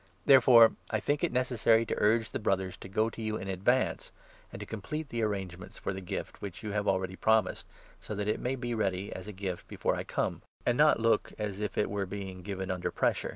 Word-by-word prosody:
Therefore 125 -4 +8 0.2
I 110 - 0
think 145 +8 -1
it 175 - +2
necessary 120 -3 +3
to - - -2
urge 110 +2 +4
5 - - -11
the - - -3
Brothers 95 -3 0
to - - -10
go 110 +3 +1
to 115 - -8
you 110 0 -2
in 95 - -6
advance, 125 - 0 0.4
and - - -8
to - - -6
complete 150 -1 -5
the 120 -2 -2
arrangements 95 -4 -3
for - - -3
the 95 - -6
gift, 90 - -6
which 95 0 -7
you 105 - -3
have 105 0 -1
already 95 -1 0
promised, 110 -1 +1 0.3
so 105 - -6
that 105 0 -2
it 105 - 0
may 125 +2 -1
be 120 -2 -3
ready, 100 -3 -1
as 95 - -8
a - - -5
gift, 95 -2 -5
before - - -1
I - - -3
come, - - -2 0.2
and 120 - +3
not 150 0 +5
look 115 0 +2
as 105 -2 -3
if 105 -1 -3
it 105 - +2
were 100 -1 -2
being 95 -1 -6
given 95 0 -4
under 90 -1 -2
pressure. - - 0
105 Hz, 235 wpm, -30 LUFS, 95-115 Hz, 0.4 s, Therefore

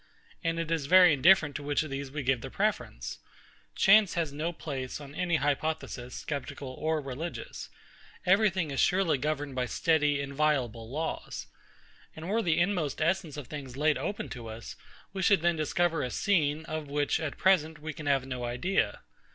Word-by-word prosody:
And 165 -1 0
it 165 -1 -2
is 160 -4 0
very 180 -1 +8
indifferent 150 +1 +5
to - - -8
which 145 +1 0
of 155 - -8
these 135 0 -4
we 145 +1 -4
give 130 -2 +1
the - - -6
preference. - - -2 0.6
Chance 200 -1 +5
has 165 -5 -1
no 155 +4 -2
place, 140 -6 -5
on 145 -1 -10
any 175 +1 0
hypothesis, 145 -3 -2
sceptical 140 -1 -4
or 155 +4 -1
religious. 150 - -6 0.6
Every 200 +4 +5
thing 175 -5 -2
is 135 - -2
surely 180 -6 +3
governed 145 -1 -2
by 125 -1 -1
steady, 150 0 +2
inviolable 135 -5 0
laws. 155 +5 -4 0.7
And 160 +3 -7
were 225 +3 +2
the 165 -6 +1
inmost 175 -5 0
essence 165 -2 0
of 145 - -6
things 135 -2 -8
laid 150 +1 +2
open 205 - -3
to 120 -3 -7
us, 110 +1 -8 0.4
we 190 - -3
should 190 -3 +4
then 175 -1 +3
discover 160 +1 +1
a 125 - -2
scene, 155 -1 +1
of 155 -2 -4
which, 145 +2 0
at 160 -4 -4
present, 160 -5 +3
we 155 +1 -5
can 150 0 -7
have 135 -2 +2
no 125 -2 -5
idea. 125 +11 0
150 Hz, 180 wpm, -29 LUFS, 140-170 Hz, 0.7 s, very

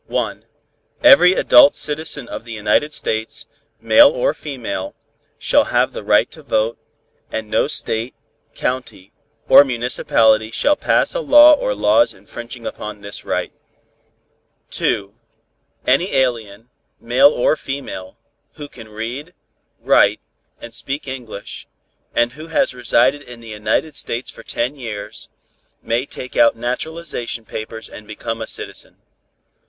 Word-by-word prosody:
Every 270 -12 +8
adult 140 -5 +6
citizen 150 -3 -1
of - - -7
the 115 - -11
United 110 +7 +1
States, 110 -5 -2 0.3
male - - +6
or - - 0
female, 120 -9 -6 0.4
shall - - +2
have - - +1
the - - -6
right - - +3
to - - -12
vote, 110 +2 -1 0.5
and 110 -1 -4
no - - +2
state, 115 -4 -2 0.4
county 125 -7 -4 0.4
or - - +9
municipality 115 -3 +1
shall 290 - +2
pass - - +1
a - - -2
law 300 -8 +7
or 105 - 0
laws 105 +3 +3
infringing 115 +4 -10
upon 105 -1 -7
this 100 0 -6
right. - - -3 1.2
2. 100 0 -1 0.7
Any 155 +10 +2
alien, 115 -4 -1 0.3
male 130 +4 +4
or 145 +1 +1
female, 135 -10 -7 0.4
who 145 -2 -9
can 115 -5 -13
read, 120 +10 -7 0.5
write - - +3 0.4
and 120 - -10
speak 135 +5 -4
English, 125 -6 -8 0.5
and 120 0 +2
who 155 +5 -11
has 165 - +1
resided 125 +3 +2
in 120 -4 -12
the 115 -1 -12
United 110 +8 -2
States 120 -2 -4
for - - -13
ten 125 +5 -3
years, 110 -4 -7 0.5
may 120 +4 -1
take 125 - -9
out 115 - +4
naturalization 125 0 -4
papers 110 0 -7
and 105 - -12
become 115 +1 -5
a 110 - -4
citizen. - - -7
120 Hz, 130 wpm, -19 LUFS, 110-145 Hz, 1.2 s, or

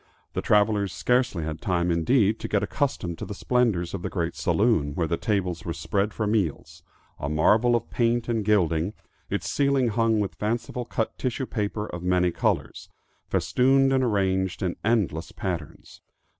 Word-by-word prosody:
The - - -1
travelers 105 -2 +2
scarcely 125 -8 +1
had 75 0 -5
time 90 -1 0
indeed 105 +6 +2
to - - -4
get 105 -1 +1
accustomed 100 - -2
to - - -4
the 105 - -6
splendors 110 -9 +1
of 100 - -4
the - - -3
great - - -2
saloon 100 -11 +1
where 85 - 0
the 85 - 0
tables 95 -4 -1
were 85 - -3
spread 100 +3 -1
for 110 - -2
meals, 105 -8 -1 0.4
a 70 - -3
marvel 110 +10 +3
of 120 - -3
paint 120 0 +1
and 115 -3 0
gilding, 90 -3 +2 0.4
its 100 - -2
ceiling 140 -3 +2
hung 115 0 +2
with 100 -2 -1
fancifully 120 +3 -3
cut 115 - -2
tissue 130 +1 -2
paper 105 -2 -3
of 90 -4 -7
many 90 0 +2
colors, - - -2 0.4
festooned 135 +1 +3
and 130 -1 +3
arranged 95 -5 0
in 90 -2 -1
endless 100 -8 0
patterns. 85 -6 -6
105 Hz, 170 wpm, -25 LUFS, 90-120 Hz, 0.4 s, marvel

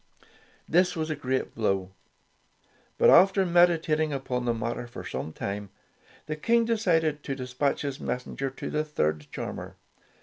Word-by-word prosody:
This 180 +2 +3
was 160 -1 -2
a - - -1
great 130 -2 -2
blow, 95 -4 -1 1.1
but - - +6
after 190 +1 +6
medi 175 -1 +5
tating 155 -1 0
upon 130 -3 -2
the 120 - +2
matter 120 +1 -3
for 120 - -9
some 65 +5 -4
time, 100 +4 -5 0.6
the 155 - -3
King 230 +9 +2
decided 165 -10 +1
to 135 - -4
despatch 130 +3 -1
his 140 -2 -3
messenger 130 +2 -3
to 135 - -7
the 155 0 0
third 75 - -1
charmer. - - -6
145 Hz, 155 wpm, -27 LUFS, 120-165 Hz, 1.1 s, but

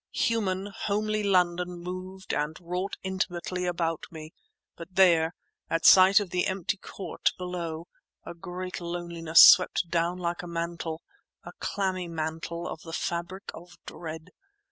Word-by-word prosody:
Human, 200 -3 0
homely 215 +1 -1
London 180 -2 +1
moved 185 +2 -6
and 150 +1 -2
wrought 180 +3 -4
intimately 185 -1 -2
about 165 -2 -2
me; 155 -1 -10 0.4
but 170 +2 -11
there, 170 -3 +4 0.3
at 165 - -1
sight 190 +1 +8
of 200 -4 -5
the 180 - +1
empty 190 +1 -2
court 195 0 -3
below, 170 -3 -5 0.4
a - - -7
great 180 +2 -6
loneliness 170 -1 +4
swept 175 - +6
down 170 +1 +1
like 175 -1 -3
a 175 - -8
mantle—a 170 - -7
clammy 185 -3 -2
mantle 165 +1 -4
of 155 - -6
the 165 - -10
fabric 175 +4 -4
of 175 +1 -13
dread. 160 +1 -8
175 Hz, 135 wpm, -27 LUFS, 170-185 Hz, 0.4 s, sight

